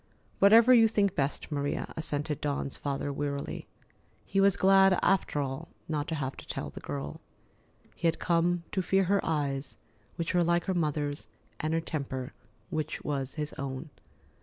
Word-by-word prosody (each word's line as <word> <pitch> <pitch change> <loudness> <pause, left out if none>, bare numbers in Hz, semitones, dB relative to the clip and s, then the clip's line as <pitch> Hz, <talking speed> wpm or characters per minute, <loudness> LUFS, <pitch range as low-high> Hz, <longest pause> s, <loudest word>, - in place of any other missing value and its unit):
"Whatever 225 +5 +8
you 225 -2 +7
think 205 -3 +2
best, 145 -1 -2
Maria," 145 -1 -2
assented 150 -1 -2
Dawn's 140 -2 -2
father 140 0 -3
wearily. 140 0 -3 0.6
He 195 - +1
was 195 -1 +4
glad, 195 -1 +6
after 190 -6 +2
all, 135 +4 -4 0.2
not 150 -2 -2
to 160 - -2
have 135 -3 -3
to - - -11
tell - - -4
the - - -8
girl. 70 0 -5 0.7
He 170 - 0
had 165 - +1
come 170 0 +1
to 190 - 0
fear 195 +2 +2
her 195 +2 +2
eyes, 145 -3 -2 0.4
which 170 +1 -2
were 175 -1 +4
like 170 0 +2
her 190 - -1
mother's, 150 -3 -1 0.3
and 155 - -1
her 165 - +1
temper, 140 -4 -4 0.4
which 155 -1 -3
was 135 -2 -2
his 150 -1 -3
own. 140 +2 -5
155 Hz, 165 wpm, -29 LUFS, 140-180 Hz, 0.7 s, Whatever